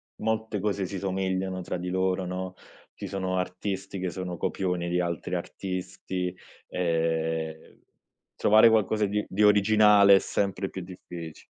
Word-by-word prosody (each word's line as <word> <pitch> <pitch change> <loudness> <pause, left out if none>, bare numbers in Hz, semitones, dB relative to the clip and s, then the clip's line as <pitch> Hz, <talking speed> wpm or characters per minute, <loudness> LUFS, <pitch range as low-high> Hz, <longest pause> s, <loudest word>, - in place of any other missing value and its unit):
molte 110 -1 -2
cose 100 -1 -1
si 95 +2 -5
somigliano 95 -1 -2
tra 90 - -4
di 90 +1 -4
loro, 95 0 0
no, 95 +1 -4 0.4
ci - - -6
sono 95 -1 -2
artisti 95 +1 -3
che 95 - -2
sono 90 0 -5
copioni 90 0 -1
di 90 +1 +1
altri 85 +1 -2
artisti, 90 0 -4 0.3
ehm, 80 -2 -2 0.6
trovare 110 +2 +6
qualcosa 110 -1 +2
di 105 +1 -1
di 105 +3 0
originale 105 -1 +6
è 95 - +5
sempre 100 -1 -1
più 95 - -6
diffici 90 -3 -9
95 Hz, 140 wpm, -27 LUFS, 90-100 Hz, 0.6 s, trovare